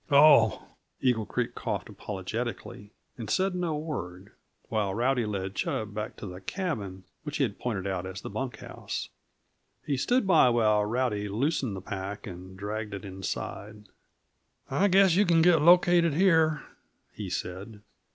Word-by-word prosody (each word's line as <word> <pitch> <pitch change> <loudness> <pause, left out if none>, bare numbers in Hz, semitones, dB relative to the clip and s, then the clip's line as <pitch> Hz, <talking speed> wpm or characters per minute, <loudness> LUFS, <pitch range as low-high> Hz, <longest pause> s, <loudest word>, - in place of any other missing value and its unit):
"Oh!" 140 -7 +6 0.3
Eagle 120 -5 +1
Creek - - -2
coughed - - -3
apologetically, 105 +1 -5 0.3
and 115 - -6
said 190 0 +1
no 175 -4 -1
word, 100 - -6 0.4
while 105 -4 -1
Rowdy 120 0 +1
led 95 -2 -3
Chub 105 0 -2
back 105 +1 -4
to - - -8
the 90 -1 -8
cabin 100 - -4 0.2
which 150 -1 -5
he 145 - +2
had 105 -6 -2
pointed 105 -6 -3
out 95 -2 -2
as 95 +1 -6
the - - -8
bunk 120 +2 -4
house; - - -6 0.8
he 140 -2 0
stood 245 - +2
by 165 -9 +6
while 110 -3 +3
Rowdy 105 -3 -1
loosened 130 0 -1
the 95 - -6
pack 100 +2 -6
and 95 0 -9
dragged 105 +1 -4
it 100 - -8
inside. 100 +2 -6 0.8
"I 200 - +3
guess 190 -2 +5
you 200 - +5
can 170 -4 +4
get 170 -3 +5
located 175 -1 +5
here," 160 -4 +3 0.5
he - - -6
said. 100 +4 -5
110 Hz, 155 wpm, -28 LUFS, 100-155 Hz, 0.8 s, Oh